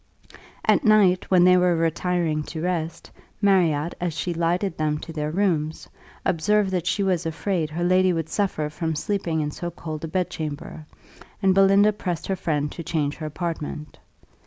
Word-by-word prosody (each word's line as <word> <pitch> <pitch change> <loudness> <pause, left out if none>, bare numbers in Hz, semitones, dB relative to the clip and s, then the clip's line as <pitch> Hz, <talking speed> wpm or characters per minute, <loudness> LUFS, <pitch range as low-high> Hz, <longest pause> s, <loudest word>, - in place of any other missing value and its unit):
At - - +3
night, 210 -5 +4
when 180 -2 +5
they 180 0 +6
were 180 -1 +3
retiring 165 -1 0
to 160 -1 -6
rest, 170 -2 -3 0.3
Marriott, 175 -6 +2
as 175 -3 -2
she 175 +2 -2
lighted 170 +2 0
them 150 -1 0
to 165 - -8
their 150 -1 -2
rooms, 160 -3 -1 0.4
observed 195 +4 +2
that 180 -2 -1
she 200 - +1
was 185 -3 +1
afraid 165 0 -1
her 165 +3 -3
lady 185 +1 +4
would 165 -2 -2
suffer 160 -6 -1
from 160 0 -2
sleeping 170 -2 -1
in 150 0 -2
so 175 +3 -5
cold 155 -2 -7
a - - -2
bedchamber, 155 -3 -4 0.5
and 195 -2 +3
Belinda 195 +2 +5
pressed 180 -5 -4
her 195 - -1
friend 150 -5 -1
to 170 - -7
change 150 -3 -1
her 155 - -5
apartment. 155 -2 -5
170 Hz, 170 wpm, -24 LUFS, 155-185 Hz, 0.5 s, they